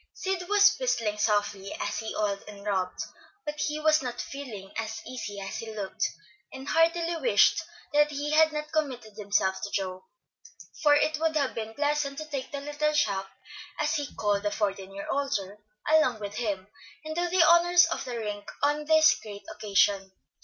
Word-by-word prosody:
Sid 375 -1 -3
was 415 +1 +6
whistling 225 - 0
softly 205 -2 0
as - - -2
he 220 - -5
oiled 205 -2 0
and 205 -1 -11
rubbed, 190 -3 -1 0.4
but 300 0 -4
he 300 0 -1
was 310 0 +4
not 245 -2 -5
feeling 225 -9 -7
as 220 0 -3
easy 210 -5 -6
as 195 0 -5
he 220 -1 -7
looked, 200 -3 -1 0.4
and 265 +1 -9
heartily 335 +1 +2
wished 265 +2 +4 0.3
that 295 0 +5
he 290 0 -3
had 315 +1 +5
not 300 0 -4
committed 260 -8 -2
himself 195 -2 0
to 205 - -4
Joe, 185 -2 -3 0.8
for 295 -2 +6
it 305 +1 +2
would 320 0 +1
have 280 -3 +1
been 220 0 -5
pleasant 290 -1 0
to 310 - -4
take 280 -4 -5
"the 280 - -4
little 295 +1 -1
chap," 195 -9 +1 0.5
as 305 +1 +1
he 290 -3 -1
called 205 -1 +1
the 205 - 0
fourteen 195 -2 -2
year 200 0 -7
older, 210 -8 -2 0.3
along 310 -7 +4
with 205 -1 -5
him, 205 -5 -2 0.4
and 310 - -4
do 350 +1 0
the 365 0 +5
honors 345 +1 +6
of 330 0 -3
the 245 -2 -5
rink 210 -2 -5
on 295 +1 +2
this 315 0 +6
great 205 -2 -9
occasion. 195 -2 +2
260 Hz, 180 wpm, -28 LUFS, 205-305 Hz, 0.8 s, was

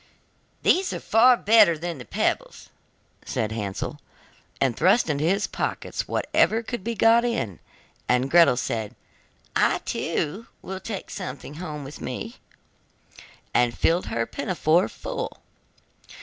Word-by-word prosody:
'These 370 +1 +3
are - - -4
far 240 +3 +5
better 210 -7 +5
than 165 -5 -5
pebbles!' - - -2 0.5
said 110 -1 -2
Hansel, 105 -3 -4 0.6
and 130 -4 +1
thrust 185 +1 +3
into 145 0 -1
his 195 +4 +2
pockets - - -3
whatever 225 +2 +1
could 240 -3 -5
be 235 +1 -3
got 225 +3 +5
in, 230 - -2 0.5
and 125 +1 +3
Gretel 170 -7 +6
said: 115 -4 -3 0.6
'I, - - +3
too, 195 +10 -2 0.2
will 190 0 -5
take 195 0 -6
something 135 +2 -6
home 150 -5 -5
with 135 +2 -10
me,' - - -5 1.2
and 120 -1 +2
filled 170 +2 +2
her 115 0 -1
pinafore 170 +2 +1
full. - - -5
170 Hz, 125 wpm, -25 LUFS, -, 1.2 s, Gretel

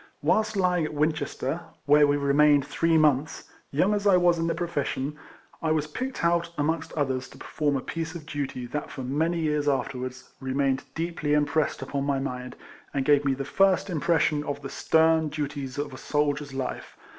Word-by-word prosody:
Whilst 215 -1 +2
lying 180 -3 +2
at 155 0 -4
Winches 150 -1 0
ter 140 +6 -2 0.2
(where 145 0 +6
we 145 0 +2
remained 145 0 +4
three 165 +2 +2
months), 150 -1 +2 0.3
young 185 +9 +2
as 205 0 0
I 190 -2 +6
was 175 -1 +3
in 165 - 0
the 165 - 0
profession,! 150 -4 -2 0.5
was 155 -2 +1
picked 255 - -4
out, 170 0 +2
amongst 160 +1 -1
others, 130 -3 -1
to - - -14
perform 145 -2 -1
a - - -3
piece 165 +3 -5
of 160 -3 -8
duty 140 -4 -4
that, 145 +5 -4
for 135 - -6
many 160 +7 0
years 150 -2 +1
afterwards, 130 -2 -3
re 130 -1 -4
mained 135 -1 +1
deeply 165 -3 -1
impressed 150 -1 +1
upon 140 +1 -3
my 140 -1 +1
mind, 125 -2 -4 0.4
and 135 -1 0
gave 145 -1 +4
me 135 -1 +1
the 135 +1 -4
first 195 +4 +2
impression 155 -2 +1
of 145 -1 -5
the 135 - -6
stern 160 -1 +3
duties 145 -3 -4
of 145 -1 -3
a 130 - -9
soldier's 145 -1 -1
life. 135 -1 -5
150 Hz, 190 wpm, -26 LUFS, 140-165 Hz, 0.5 s, where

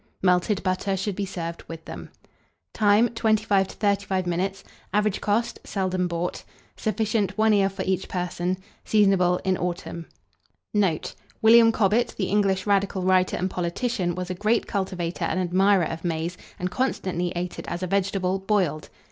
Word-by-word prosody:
Melted 180 +2 +2
butter 190 +1 0
should 195 +1 -2
be 200 0 -2
served 170 -3 -5
with 165 -1 -9
them. - - -8 0.6
Time. 215 +2 +4
25 215 -4 +2
to - - -11
35 200 -2 0
minutes. 190 +3 -2 0.3
Average 210 0 +1
cost. 215 +3 0
Seldom 185 -2 -1
bought. 170 +1 -3 0.3
Sufficient, 215 -3 -1
1 220 0 +4
ear 195 -1 +3
for 195 - -5
each 190 0 -1
person. 180 0 -2 0.3
Seasonable 195 -4 +3
in 190 -1 +1
autumn. 170 -1 -4 0.7
Note. 195 -7 +1 0.3
William 230 +1 +7
Cobbett, 220 +2 +1
the 190 - -1
English 195 -2 +1
radical 200 -2 +1
writer 185 0 +3
and 185 - 0
politician, 180 +1 -2
was 180 0 -4
a - - -1
great 215 +5 +1
cultivator 185 -4 -2
and 185 - -1
admirer 185 +1 +3
of 160 +1 -5
maize, 170 0 -2 0.2
and 180 0 -3
constantly 180 -7 -1
ate 175 +1 -4
it - - -8
as 175 +2 -4
a - - +1
vegetable, 195 0 0
boiled. 190 -6 0
190 Hz, 155 wpm, -25 LUFS, 180-205 Hz, 0.7 s, William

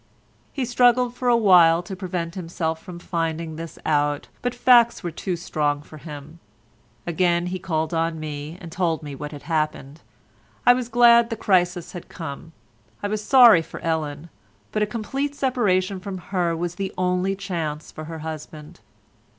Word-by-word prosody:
He 270 -3 -2
struggled 245 0 +3
for 250 0 -4
a 240 -1 +5
while 175 -6 +6
to 190 +2 -7
prevent 180 -3 -4
himself 165 -3 -3
from 180 -3 -9
finding 165 -2 -3
this 165 +1 -8
out, 145 -1 0
but 245 0 -2
facts 240 -2 +5
were 175 - -3
too 180 +3 -3
strong 150 -4 -1
for 155 - -13
him. 150 +1 -10 0.7
Again 175 0 +1
he 185 +1 -3
called 160 -3 -2
on 165 0 -1
me 150 +1 -6
and 170 -2 -10
told 165 -2 -1
me 145 -1 -7
what 150 +2 -7
had 145 -2 -10
happened. 155 -2 -2 0.6
I 245 - +8
was 245 -1 -3
glad 235 -1 +6
the 225 - -2
crisis 180 -4 +1
had 175 - -9
come; 160 -1 -8 0.5
I - - +1
was 215 0 -3
sorry 240 -8 +7
for - - -9
Ellen, 160 -1 -3 0.4
but 215 - -1
a 210 - +2
complete 270 +7 -3
separation 200 -9 +1
from 195 0 -6
her 175 -2 -1
was 175 0 -3
the 195 - -2
only 180 +1 0
chance 165 -6 -4
for 155 - -8
her 165 +1 -7
husband. 155 -1 -8
175 Hz, 170 wpm, -23 LUFS, 160-205 Hz, 0.7 s, I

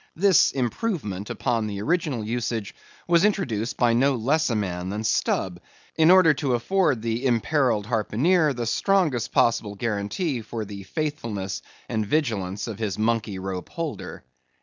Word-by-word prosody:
This 190 -1 +5
improvement 120 - -2
upon 115 -4 -1
the 100 -2 -4
original 150 - 0
usage 110 -5 -3 0.3
was 170 0 +4
introduced 130 - 0
by 120 -2 +3
no 135 +3 +3
less 145 +7 +1
a 115 - 0
man 90 -3 -2
than 105 +2 -3
Stubb, 95 -4 0 0.4
in 160 +1 +5
order 180 -4 +7
to 135 -3 0
afford 130 - +1
the 115 +2 -2
imperilled 120 -3 +1
harpooneer 135 - +2
the 120 -1 -3
strongest 155 - +1
possible 115 -3 +2
guarantee 115 - -2
for 110 0 -5
the 100 -1 -8
faithfulness 110 -5 -4 0.3
and 110 - -1
vigilance 105 -7 -1
of 110 -3 -6
his 105 -4 -2
monkey 110 -2 0
rope 95 -1 -5
holder. 165 -4 -5
115 Hz, 150 wpm, -25 LUFS, 105-150 Hz, 0.4 s, order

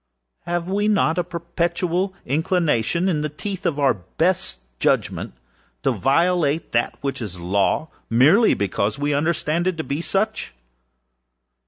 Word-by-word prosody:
Have 175 0 -1
we 205 +2 0
not 190 -5 +2
a - - +1
perpetual 170 +2 -2
inclination, 160 - +1
in 160 -5 +1
the 150 - -1
teeth 190 +5 -4
of 150 - -1
our 140 -2 +3
best 170 - -1 0.2
judgment, - - 0 0.5
to - - +3
violate 165 +2 +1
that 120 0 0
which 140 -2 -3
is 95 -5 -6
Law, 100 - +1 0.2
merely 150 - +5
because 100 +1 -1
we 145 +1 0
understand 160 +3 0
it 185 -3 0
to 160 - -2
be 145 +2 -3
such? 200 - -1
165 Hz, 140 wpm, -22 LUFS, 140-180 Hz, 0.5 s, merely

